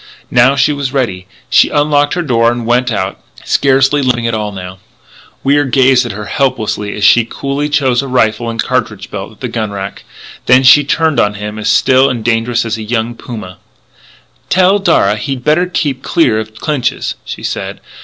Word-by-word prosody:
Now 125 +3 +4
she 140 +2 +2
was 140 -2 -3
ready. 115 -10 -2 0.2
She - - +4
unlocked 145 0 +1
her 175 - -1
door 115 -5 +2
and 120 -1 -4
went 125 +1 +1
out, 95 -3 -3 0.2
scarcely 135 +1 +2
limping 125 -3 0
at 115 - -1
all, 105 -1 -2
now. 95 -1 -8 0.6
Wier 145 +2 +3
gazed 130 -1 +3
at - - -5
her 105 +1 -7
helplessly 110 -5 -2
as 105 - -5
she 115 +3 +5
coolly 140 +5 -3
chose 135 -4 +1
a 140 - -6
rifle 120 -2 0
and 115 0 -6
cartridge - - -2
belt - - -6
at - - -21
the - - -2
gun 110 -2 -3
rack. 100 -1 -7 0.4
Then 130 +1 +5
she 140 +3 +7
turned 160 +1 +1
on 105 0 +1
him 105 +1 -6
as 105 - -1
still 130 +1 +4
and 120 -3 -4
dangerous 115 0 0
as 115 -1 -3
a - - -5
young 115 +1 -2
puma: 110 -6 -9 0.9
"Tell 185 +2 +3
Darragh 105 - +2
he'd 125 +3 -4
better 155 +5 +2
keep 145 -7 -2
clear 120 -10 +1
of 110 0 -7
Clinch's," 140 0 -2
she - - -8
said. - - -4
125 Hz, 190 wpm, -13 LUFS, 110-140 Hz, 0.9 s, she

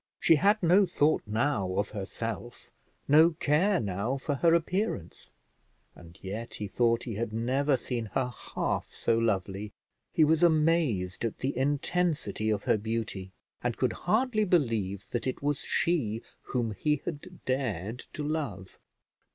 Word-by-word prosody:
She 165 - +5
had 205 +4 +3
no 185 +4 +5
thought 155 -3 +2
now 110 -4 0
of 100 +2 0
herself, 115 +4 -6 0.4
no 160 +4 +6
care 170 +6 +2
now 100 +6 -2
for 145 +2 -2
her 165 +4 +4
appearance; 170 - -2 0.6
and 85 -1 -14
yet 110 +5 -5
he 105 - -4
thought 115 +2 +1
he 120 - -4
had 110 +2 -3
never 130 +5 +1
seen 120 -4 -4
her 125 -2 0 0.2
half - - -1
so 115 - +1
lovely; 105 -2 -1 0.4
he 160 - +4
was 155 +2 +3
amazed 155 - +2
at 115 - -2
the 135 +2 -2
intensity 145 - 0
of 105 -2 0
her 110 - +2
beauty, 110 -3 -3 0.3
and - - -2
could - - +1
hardly 220 -1 +1
believe 115 - 0
that 120 - -2
it 130 - -3
was 145 -1 0
she 120 -10 0 0.2
whom 120 -3 -2
he 150 +8 0
had 150 -4 -7
dared 120 -5 -2
to 150 - -4
love. 140 - -4
125 Hz, 150 wpm, -29 LUFS, 105-155 Hz, 0.6 s, no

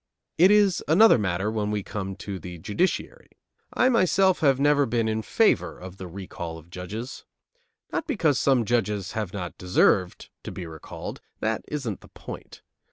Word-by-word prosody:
It 180 +3 +8
is 205 -3 +4
another 185 - +6
matter 95 +1 -1
when 105 -2 -1
we 105 -1 -1
come 95 -1 -5
to 95 0 -6
the 90 -1 -8
judiciary. 180 - -2 0.4
I 255 - +3
myself 190 -5 +3
have 135 -4 +3
never 145 0 +4
been 115 -1 0
in 110 0 0
favor - - +2
of 95 +1 -10
the 95 - -7
recall 85 -2 -7
of 80 +1 -16
judges. 105 +9 -6 0.7
Not 325 - -2
because 170 - +2
some 130 -4 +3
judges 105 -4 0
have 105 -5 -3
not 90 -3 -6
deserved 90 0 +2
to - - -6
be 90 - -6
recalled. 80 -2 -8 0.2
That 110 0 -1
isn't 130 -9 -4
the - - -15
point. - - -10
110 Hz, 165 wpm, -25 LUFS, 95-145 Hz, 0.7 s, It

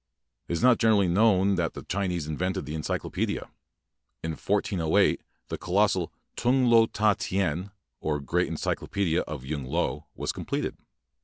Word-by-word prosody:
It - - -3
is 85 - -1
not 125 -1 +6
generally 110 -4 +4
known 100 +1 +4
that 85 -3 -1
the - - -7
Chinese 90 -4 -2
invented 90 +3 -2
the 75 - -5
encyclopaedia. 80 -1 -2 0.7
In 80 - -2
1408 80 +1 +1 0.3
the - - -4
colossal 95 -2 +1 0.2
'Tung 125 +2 +2
Lo 115 -2 +6
Ta 105 -1 +2
Tien", 95 -1 -1 0.3
or 75 -1 -1
"Great 70 -2 0
Encyclopaedia 90 -4 -1
of 75 -4 -6
Yung 70 0 -3
Lo", 80 +7 -2
was - - -2
completed. - - -3
90 Hz, 145 wpm, -27 LUFS, 80-100 Hz, 0.7 s, not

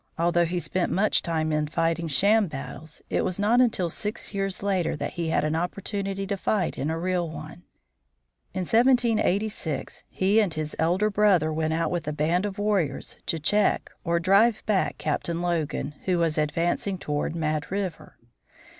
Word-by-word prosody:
Although 175 +1 +3
he 175 +2 -2
spent 175 +1 -1
much 210 +3 +2
time 160 -2 -1
in 150 0 0
fighting 165 +2 0
sham 200 - +3
battles, 150 +1 -8
it - - +2
was 185 - -2
not 220 +5 +4
until 190 -8 +1
six 210 +3 -4
years 195 -1 -2
later 190 -5 0
that - - -4
he 170 -2 -2
had - - +1
an 155 +1 0
opportunity 195 +3 -3
to 195 +1 -2
fight 190 -2 0
in 145 - -2
a 160 - -1
real 175 0 -1
one. 155 +3 -9 0.9
In 185 - -3
1786 220 - +1
he 195 +4 +2
and 195 -7 +1
his 155 -1 -3
elder 185 +6 +2
brother 195 -7 +3
went 160 0 0
out 165 0 0
with 175 -3 -2
a 150 - -1
band 165 +6 +1
of 200 0 -7
warriors 205 -7 -1
to 165 - 0
check 205 +7 +1
or 170 -1 +1
drive 205 +5 +3
back 200 -3 +1
Captain 165 +2 -2
Logan, 165 -4 -1
who 185 -2 +2
was 165 -2 +1
advancing 170 +5 0
toward 150 0 -2
Mad 155 -2 -1
River. 190 -4 -4
175 Hz, 170 wpm, -26 LUFS, 160-200 Hz, 0.9 s, not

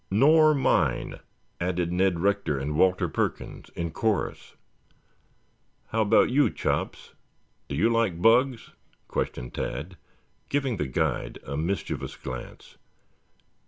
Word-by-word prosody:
"Nor 155 +8 +5
mine," 135 - +1 0.4
added 85 -1 -1
Ned 90 -1 +1
Rector 100 -7 +1
and 70 +3 -3
Walter 95 +3 +3
Perkins - - -3
in 85 -1 -3
chorus. 110 +4 -2 1.3
"How 110 - 0
about 110 +2 +4
you, 145 +3 +4
Chops? - - -3 0.5
Do 70 - -4
you 90 +11 +3
like 115 -7 +1
bugs?" 120 +5 +3 0.4
questioned - - -3
Tad, 80 +9 -4 0.5
giving 140 -5 0
the 75 - -2
guide 65 - -1
a 70 - -4
mischievous 85 +7 -3
glance. 65 -1 -9
95 Hz, 115 wpm, -26 LUFS, 85-115 Hz, 1.3 s, Nor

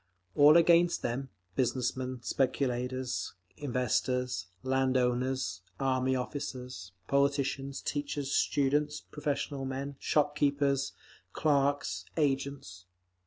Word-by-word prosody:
All 145 - +6
were - - +7
against 170 +1 +4
them—business 120 0 -2
men, 130 -1 -5
speculators, 130 -1 -1 0.2
investors, 125 -5 -1 0.2
land 130 0 +2
owners, 125 -6 0 0.2
army 130 -1 +1
officers, 125 -7 -5 0.2
politicians, 140 -1 0
teachers, 145 -1 -2
students, 145 +2 +1
professional 145 -1 -3
men, 135 +1 -4
shop 150 -1 +1
keepers, 140 -1 +1 0.4
clerks, 140 -1 +1
agents. 135 - -1
135 Hz, 90 wpm, -31 LUFS, 125-140 Hz, 0.4 s, were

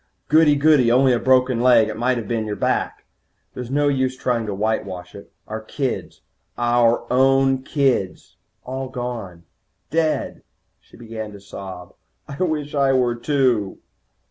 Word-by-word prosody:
'Goody, 155 -1 +5
goody, 140 -5 +4
only 130 +1 +4
a 120 - +1
broken 130 -2 +2
leg. 120 -3 +5
It 110 - -5
might 125 +3 0
have 115 -3 -5
been 110 -1 -2
your 105 - -3
back.' - - -2 0.5
There's 125 -1 -7
no 145 +2 +1
use 130 -2 0
trying 120 -4 -1
to 105 - -3
whitewash 95 -4 -3
it. 100 - -12 0.2
Our 110 +1 -5
kids, 130 +4 -4 0.4
our 120 -1 +2
own 135 0 +3
kids, 130 - -1 0.3
all 130 +1 -5
gone. 120 -9 -6 0.5
Dead." 160 -1 -1 0.4
She - - -20
began 110 -2 -7
to 100 - -11
sob. 95 -2 -10 0.3
"I 140 +3 -8
wish 155 -5 -1
I 140 -2 +2
were, 125 -2 +2
too." 120 -5 0
125 Hz, 150 wpm, -21 LUFS, 110-135 Hz, 0.5 s, Goody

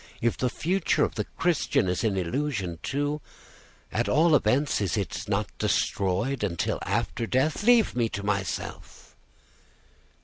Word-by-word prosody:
If 120 0 +1
the 125 - 0
future 180 +7 +1
of - - 0
the - - -2
Christian 165 - +1
is 90 +4 -1
an 105 -4 +1
illusion 95 - -2
too, 145 +2 -2 0.7
at - - 0
all 160 +3 +4
events 135 0 +2
it 95 -2 0 0.2
is - - -6
not 100 -2 -1
destroyed 100 +7 0
until 85 -5 -1
after 115 - -1
death. 135 - +1
Leave 230 - +4
me 120 -2 +1
to 100 -1 -5
myself." 100 -2 -4
120 Hz, 140 wpm, -27 LUFS, 100-150 Hz, 0.7 s, all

